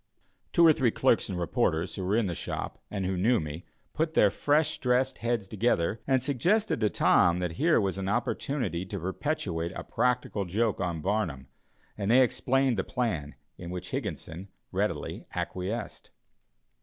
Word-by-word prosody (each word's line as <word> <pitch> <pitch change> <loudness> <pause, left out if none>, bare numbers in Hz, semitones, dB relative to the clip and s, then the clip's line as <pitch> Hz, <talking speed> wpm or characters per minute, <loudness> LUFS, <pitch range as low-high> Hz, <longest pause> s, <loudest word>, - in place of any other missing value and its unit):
Two 170 - +5
or 160 - +8
three 130 -6 +2
clerks 120 -1 +2
and 95 - -3
reporters, 85 -1 0
who 95 - -5
were 95 +3 +1
in 115 -1 +2
the 90 - -2
shop, - - -5
and 100 -2 -3
who 95 +1 -1
knew 110 +7 +3
me, 75 +2 -6 0.3
put 160 +1 -1
their 105 - +5
freshly 150 +7 +1
dressed 130 +1 +1
heads 115 -3 -1
together 110 -1 0
and 130 -2 +2
suggested 175 - +1
to 110 -2 +2
Tom 85 -3 +4
that 90 -1 -2
here 155 - +3
was 95 -2 -1
an 95 0 -2
opportunity 120 -3 -1
to 100 +2 -6
perpetrate 90 - -2
a - - -5
practical 125 -5 0
joke 105 +5 0
on 85 -4 -2
Barnum, 85 - -2 0.5
and 100 0 -1
they 130 +3 +7
explained 130 0 +1
the - - +1
plan, 95 - -2 0.2
in 85 - -7
which 90 0 -6
Higginson 85 +5 -5 0.2
readily - - -2
acquiesced. 100 +5 -4
105 Hz, 170 wpm, -28 LUFS, 90-125 Hz, 0.5 s, or